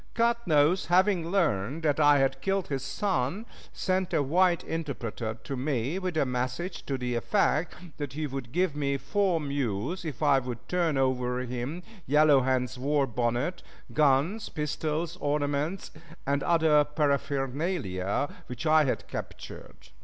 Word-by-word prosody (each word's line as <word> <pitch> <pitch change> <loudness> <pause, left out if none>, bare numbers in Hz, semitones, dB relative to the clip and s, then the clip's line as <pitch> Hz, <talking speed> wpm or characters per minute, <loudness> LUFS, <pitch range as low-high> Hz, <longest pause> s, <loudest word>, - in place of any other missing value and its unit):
Cut 235 -1 +1
Nose 155 +3 +3
having 180 -1 +3
learned 155 - 0
that 150 -1 +1
I 145 -1 +6
had 135 0 +1
killed 195 -2 -1
his 135 -2 -2
son, 180 - -1 0.3
sent 185 -1 -1
a 145 - +3
white 175 +4 +3
interpreter 120 -8 -4
to 140 - -4
me 135 +4 -1
with 185 -3 -3
a 145 - +3
message 125 +8 -3
to 135 - -1
the 125 -1 -2
effect 160 - +1 0.2
that 145 -3 -5
he 155 +2 -2
would 135 -4 -5
give 180 0 +1
me 140 -2 0
four 195 +2 +1
mules 140 - -2
if 155 -3 -5
I 140 -2 +5
would 125 -3 -7
turn 170 -5 +1
over 125 -1 0
to - - -9
him 125 +8 -4 0.2
Yellow 150 0 +5
Hand's 130 -1 0
war 140 +1 +2
bonnet, 120 +8 -1 0.3
guns, 150 +8 +2
pistols, 155 +3 -2
ornaments, 145 +3 -1 0.3
and 140 +1 +1
other 160 -3 +4
paraphernalia 140 - -1 0.2
which 125 +4 -6
I 155 -1 +5
had 130 - -2
captured. - - -8
145 Hz, 150 wpm, -28 LUFS, 130-170 Hz, 0.3 s, I